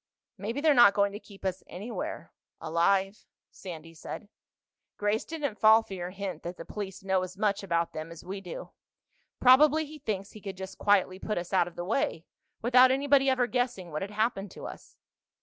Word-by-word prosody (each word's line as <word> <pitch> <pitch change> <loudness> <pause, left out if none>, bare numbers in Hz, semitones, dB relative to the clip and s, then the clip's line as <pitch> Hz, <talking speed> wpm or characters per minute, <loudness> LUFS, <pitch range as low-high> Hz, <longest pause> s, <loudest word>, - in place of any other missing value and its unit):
"Maybe 225 +7 -4
they're 310 -1 +5
not 240 -6 +7
going 200 0 +3
to 205 - -7
keep 200 -3 -14
us 185 0 -1
anywhere—alive," 195 -1 -2 0.2
Sandy 165 -3 -9
said. 205 +5 -8 0.7
"Grace 210 +2 0
didn't 285 -10 -4
fall 220 +2 +7
for 200 - -9
your 180 -1 -4
hint 195 0 -5
that 175 +1 -6
the 165 - -8
police 195 -2 -6
know 190 -1 +1
as 185 +1 -6
much 205 -1 +1
about 170 -3 -1
them 155 +1 -5
as 165 -1 -11
we 195 +2 -5
do. 180 -3 -8 0.7
Probably 300 +5 +6
he 305 +1 -11
thinks 200 -5 -3
he 215 - -12
could 195 -2 -7
just 190 0 -8
quietly 190 -2 +3
put 215 - -3
us 175 +2 -4
out 180 -2 +4
of 175 - -10
the 175 - -4
way, 180 -6 -1 0.4
without 250 +2 +7
anybody 275 0 +3
ever 260 -2 +3
guessing 245 -8 -2
what 155 - -3
had 195 - -3
happened 210 -1 -1
to - - -9
us." - - -10
200 Hz, 190 wpm, -29 LUFS, 185-235 Hz, 0.7 s, not